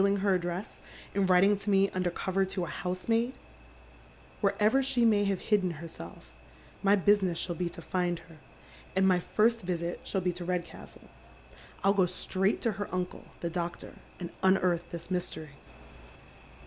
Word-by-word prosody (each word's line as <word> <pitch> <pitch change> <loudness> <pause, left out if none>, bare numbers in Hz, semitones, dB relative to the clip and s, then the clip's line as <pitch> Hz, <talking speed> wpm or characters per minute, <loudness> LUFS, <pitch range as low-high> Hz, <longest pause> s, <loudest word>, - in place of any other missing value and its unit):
s: 200 0 +3
her 200 -1 +3
address 175 +2 -3 0.3
and 195 -1 +1
writing 190 +3 +6
to 200 +1 -5
me 195 0 +5
under 185 -1 0
cover 190 +2 0
to 190 -1 -2
a - - -8
housemaid? 225 +7 -1 1.1
Wherever 210 +6 +3
she 255 -3 +2
may 210 -2 +4
have 195 -2 0
hidden 190 -5 +1
heraelf, 150 - -10 0.5
my 200 +1 +5
business 195 -3 +3
shall 175 - -1
bo 175 +1 -2
to 170 0 -8
find 175 0 0
her, 165 -1 -15 0.6
and 190 0 +4
my 180 -1 +4
first 225 +6 +2
visit 175 -2 -3
shall 190 - -1
be 180 0 0
to 175 +1 -6
Redcastle. 175 -1 -5 0.8
I'll 195 +1 +5
go 190 -3 +3
straight 190 +2 0
to 230 - +2
iier 205 0 -5
uncle, 180 -1 -3 0.2
tlie 170 - -2
doctor, 175 0 -4 0.3
and 175 -2 -5
unearth 185 -2 +2
this 170 +1 -7
mystery." 160 -4 -2
185 Hz, 160 wpm, -30 LUFS, 175-200 Hz, 1.1 s, writing